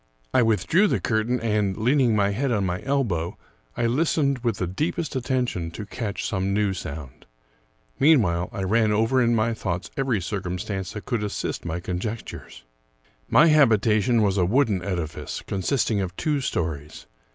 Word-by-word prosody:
I - - +5
withdrew 120 - +3
the - - +1
curtain, 115 +2 0
and, 105 -4 0
leaning 125 0 +3
my 100 -1 +2
head 130 +6 -1
on 105 -4 +1
my 90 0 -2
elbow, 110 -12 -1 0.4
I 120 - +1
listened 140 +1 +1
with 115 -4 -1
the 90 - -1
deepest 150 - -2
attention 125 -10 -1
to 95 +5 -7
catch 105 -1 -4
some 95 0 -1
new 105 -2 +1
sound. 75 -7 -8 0.7
Meanwhile, 105 - +3
I 95 - -4
ran 110 +3 +2
over 115 +5 +2
in 120 -1 +3
my 115 +1 +1
thoughts 90 -4 -4
every 130 -6 0
circumstance 95 0 -4
that 105 - -7
could 120 -5 -1
assist 105 - -3
my 85 +1 -3
conjectures. 95 - -6 0.7
My 150 - +6
habitation 115 -5 +4
was 100 -1 +1
a 90 - +3
wooden 110 -2 +2
edifice, 85 -5 -4
consisting 100 +2 0
of 95 -1 -4
two 150 - 0
stories. 80 - -3
105 Hz, 160 wpm, -24 LUFS, 95-125 Hz, 0.7 s, My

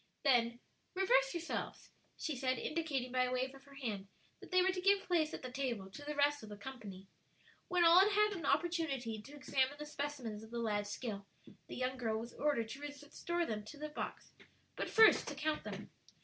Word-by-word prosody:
Then, 240 -4 +3 0.4
"Reverse - - +4
yourselves," 340 -1 -4 0.3
she 310 - -2
said, 255 0 0
indicating 285 -4 -2
by 255 0 +3
a 250 - -2
wave 255 +1 -1
of 270 0 -15
her 280 0 -15
hand, 215 -8 -4 0.3
that - - -12
they 365 -1 +5
were 375 - +4
to 370 -1 -3
give 395 +1 +4
place 330 -3 +2
at - - -6
the 255 - -5
table 240 -8 -3
to 210 - -9
the 295 +1 -4
rest 290 0 +3
of 215 - -9
the 205 - -8
company. 205 -5 -8 0.6
When 355 -1 +3
all 335 +2 +9
had 400 +2 +6
had 420 0 +4
an 335 -7 -4
opportunity 280 -8 0
to 280 +7 -12
examine 270 0 0
the 300 - -6
specimens 280 -8 -4
of 220 - -11
the 235 - -5
lad's 210 -3 0
skill, 205 -2 -4 0.4
the - - -7
young 255 +1 -1
girl 225 -3 0
was 235 +2 -6
ordered 275 -7 0
to 270 - -6
restore 290 +4 -3
them 210 -5 -3
to 290 - -10
the 305 +1 -5
box, 300 - -6 0.4
but - - -3
first 445 -1 +7
to 290 - -4
count 305 +2 -1
them. - - -6
275 Hz, 210 wpm, -36 LUFS, 235-320 Hz, 0.6 s, all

